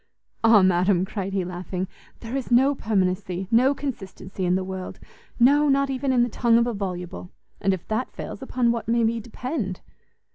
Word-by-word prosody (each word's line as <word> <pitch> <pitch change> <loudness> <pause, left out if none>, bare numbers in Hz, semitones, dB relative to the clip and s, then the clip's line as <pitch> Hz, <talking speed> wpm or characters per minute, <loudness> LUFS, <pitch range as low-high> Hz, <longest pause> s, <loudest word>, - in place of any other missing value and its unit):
"Ah, 225 -3 +7
madam!" 185 0 +3
cried 195 -1 -4
he, 190 -2 -1
laughing, 180 +1 -4 0.3
"there 235 +2 -5
is 270 -2 -3
no 260 +4 +5
permanency, 190 -5 -1
no 255 +5 +4
consistency 195 -8 -5
in 180 +1 +2
the 190 - 0
world! 190 0 -6 0.4
no, 285 +4 +5
not 275 0 +2
even 265 +1 -1
in 245 -2 +4
the - - +1
tongue 235 0 +2
of 235 - +3
a 240 - -2
VOLUBLE! 180 -3 -5 0.3
and 195 - +1
if 185 -3 -4
that 220 +4 -1
fails, - - -7
upon 250 -2 +1
what 235 -2 -3
may 235 0 +2
we 230 +1 +1
depend?" 235 - -4
220 Hz, 185 wpm, -24 LUFS, 185-250 Hz, 0.4 s, Ah